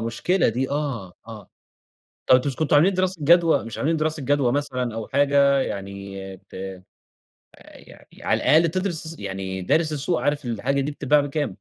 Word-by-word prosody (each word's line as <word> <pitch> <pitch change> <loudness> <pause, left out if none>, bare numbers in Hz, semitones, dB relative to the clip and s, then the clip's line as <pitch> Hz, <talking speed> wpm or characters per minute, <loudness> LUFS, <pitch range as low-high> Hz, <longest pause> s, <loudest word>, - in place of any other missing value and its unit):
مشكلة 115 +12 0
دي 125 +4 -2
آه، 135 -11 -3 0.2
آه. 105 -4 -11 0.8
طب 130 +2 +5
مش 135 - -2
كنتم 155 -2 +1
عاملين 175 +7 +5
دراسة 185 0 0
جدوى، 170 +1 +4
مش 115 - -7
عاملين 160 +3 0
دراسة 155 -1 -2
جدوى 135 -2 +2
مثلًا 125 -4 -2
أو 115 -1 -5
حاجة 140 0 +3
يعني 100 -3 -5 0.3
ت - - -20 1.1
يعني - - -16 0.2
على - - +1
الأقل 165 +2 +4
تدرس 165 -2 -3
يعني 95 -1 -5
دارس 155 - +1
السوق 150 +4 -1
عارف 145 -1 0
الحاجة 125 +4 -1
دي 145 +2 -2
بتتباع 145 0 +2
بكام؟ 145 +1 -2
140 Hz, 160 wpm, -23 LUFS, 115-155 Hz, 1.1 s, طب